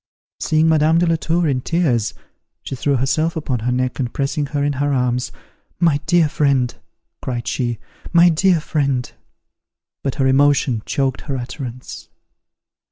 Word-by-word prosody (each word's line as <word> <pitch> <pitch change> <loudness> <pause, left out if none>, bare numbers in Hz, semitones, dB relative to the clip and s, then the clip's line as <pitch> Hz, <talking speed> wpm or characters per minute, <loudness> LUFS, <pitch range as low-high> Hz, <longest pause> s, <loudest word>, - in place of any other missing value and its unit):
Seeing 155 +1 +2
Madame 160 0 +4
de 175 - +3
la 165 -1 +2
Tour 165 +1 0
in 130 -3 0
tears, 130 -9 0 0.5
she - - -6
threw 140 +2 0
herself 155 +6 0
upon 140 -6 -2
her 120 +3 -1
neck, 125 +1 -1
and 125 -3 -1
pressing 145 +1 -2
her 145 -1 -2
in 145 0 +1
her 145 0 +1
arms, 125 -2 0 0.5
"My 165 -4 +3
dear 170 -1 +4
friend!" 140 -4 +1 0.5
cried 120 -2 -4
she, 120 -2 -1 0.3
"my 175 0 +6
dear 175 +1 +3
friend!" 140 -5 -1 0.9
but 135 - -2
her 135 - +1
emotion 135 -3 +3
choked 135 -2 -1
her 140 -3 -4
utterance. 125 0 -7
140 Hz, 155 wpm, -19 LUFS, 125-160 Hz, 0.9 s, my